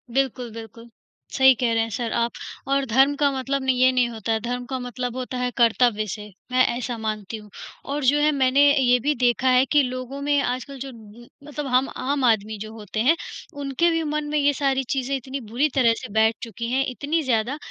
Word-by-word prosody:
बिल्कुल, 255 -3 -1
बिल्कुल, 230 +1 -11 0.5
सही 265 -1 +6
कह 235 -2 +2
रहे 225 - +2
हैं 225 - -4
सर 230 -1 -3
आप 235 0 +1 0.4
और 275 0 +1
धर्म 270 +5 +4
का 285 - +5
मतलब 270 +1 -2
नहीं 260 -1 +1
ये 255 - +6
नहीं 250 -2 +2
होता 225 -1 -4
है, 220 - +1
धर्म 245 +2 -4
का 260 +1 -4
मतलब 245 0 -4
होता 255 0 -4
है 250 0 -1
कर्तव्य 230 -2 +3
से। 210 +1 -6 0.2
मैं 255 - +1 0.2
ऐसा 240 -1 -4
मानती 215 -1 -4
हुँ 210 -1 -13 0.4
और 295 - -2
जो 290 +3 +4
है 300 +1 +3
मैंने 270 0 +3 0.2
ये 250 -1 +4
भी 295 - +2
देखा 245 +2 +2
है 255 +1 +5
कि 295 -1 +5
लोगों 255 +1 -5
में 285 0 +2
आजकल 255 +2 -3
जो 270 +1 -6
ब 225 +1 -14 0.2
मतलब 295 -1 -6
हम 255 +1 +2
आम 275 0 -1
आदमी 220 -2 +1
जो 215 +1 -7
होते 215 -1 -6
हैं, 280 +8 +4 0.4
उनके 280 +5 +1
भी 330 0 0
मन 300 0 -2
में 300 - 0
ये 285 0 +3
सारी 270 -1 0
चीजें 270 0 -1
इतनी 265 +1 -5
बुरी 265 +7 +2
तरह 235 -4 +4
से 255 - -8
बैठ 220 +1 +3
चुकी 230 0 -5
हैं। 265 +2 +2
इतनी 290 +6 -1
ज़्यादा, 245 +2 0
255 Hz, 220 wpm, -23 LUFS, 230-275 Hz, 0.5 s, सही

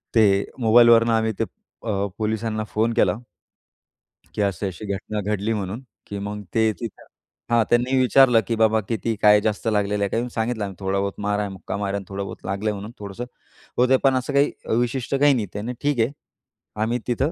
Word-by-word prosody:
ते 100 -3 +4
मोबाईलवरून 115 0 +6
आम्ही 110 -1 +2
ते - - +3 0.4
अ, 100 -3 -1
पोलिसांना 110 0 -1
फोन 115 +2 +1
केला, - - +3 1.2
की 105 - -1
असं 100 0 0
अशी 95 +3 -7
घटना 105 +2 -4
घडली 105 +2 0
म्हणून, 105 +3 -4 0.3
की 100 - -5
मग 105 +1 -5
ते 110 -1 +4
तिथं 115 - -7 0.5
हां, 120 -1 +5
त्यांनी 120 +2 +2
विचारलं, 130 -2 +6
की 115 - 0
"बाबा 110 0 +4
किती 115 0 -1
काय 105 0 +7
जास्त 110 +1 -2
लागलेलं 105 -1 +1
आहे?" 100 - 0
काही 120 +2 -1
सांगितलं 110 -1 -1
आम्ही, 100 -2 -5
"थोडाबहुत 100 +1 -1
मार 105 0 0
आहे. 105 -1 -2
मुक्का 95 - -6
मार 100 -1 -2
आहे. 100 - -3
थोडाबहुत 100 0 -5
लागलंय 100 +3 -1
म्हणून 100 +3 -7
थोडंसं" 100 +3 -6 0.5
होतंय. 125 +2 +4
पण 135 -1 +4
असं 130 +2 -2
काही 140 +1 +3 0.3
विशिष्ट 120 +2 -1
काही 145 +1 +5
नाही. 115 -5 0
त्याने 110 +5 -4
ठीक 145 -4 0
आहे. 115 +5 +1 0.7
आम्ही 120 +2 0
तिथं 130 +5 0
110 Hz, 185 wpm, -23 LUFS, 100-120 Hz, 1.2 s, काय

